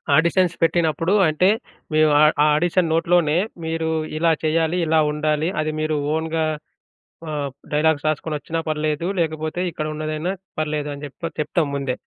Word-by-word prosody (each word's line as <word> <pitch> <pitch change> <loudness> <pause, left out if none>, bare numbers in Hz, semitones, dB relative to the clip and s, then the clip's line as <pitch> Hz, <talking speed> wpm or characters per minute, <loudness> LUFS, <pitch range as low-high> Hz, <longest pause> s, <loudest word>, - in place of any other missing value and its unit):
Auditions 170 +2 +3
పెట్టినప్పుడు 165 +1 +2
అంటే, 155 +5 +3 0.4
మీ 155 - +3
వా 145 - +5 0.2
ఆ - - +5
ఆడిషన్ 175 +2 +1
నోట్‌లోనే 165 -1 +2 0.3
"మీరు 160 0 -1 0.3
ఇలా 165 +1 +3
చేయ్యాలి, 160 +2 +1
ఇలా 160 0 +3
ఉండాలి, 150 +1 0
అది 155 0 -2
మీరు 155 -1 0 0.2
ఓన్‌గా 160 0 -1 0.9
ఆహ్, 145 -2 -2 0.2
డైలాగ్స్ 155 0 +2
రాసుకొనొచ్చినా 155 +1 -3
పర్లేదు, 155 +2 -1
లేకపోతే 155 +1 -2
ఇక్కడున్నదైనా 155 +2 -3 0.3
పర్లేదు" 150 -1 -2
అని 140 - -11
చెప్ప 145 +4 -9 0.2
చెప్తాం 150 0 0
ముందే. 135 -2 -2
155 Hz, 135 wpm, -22 LUFS, 150-165 Hz, 0.9 s, వా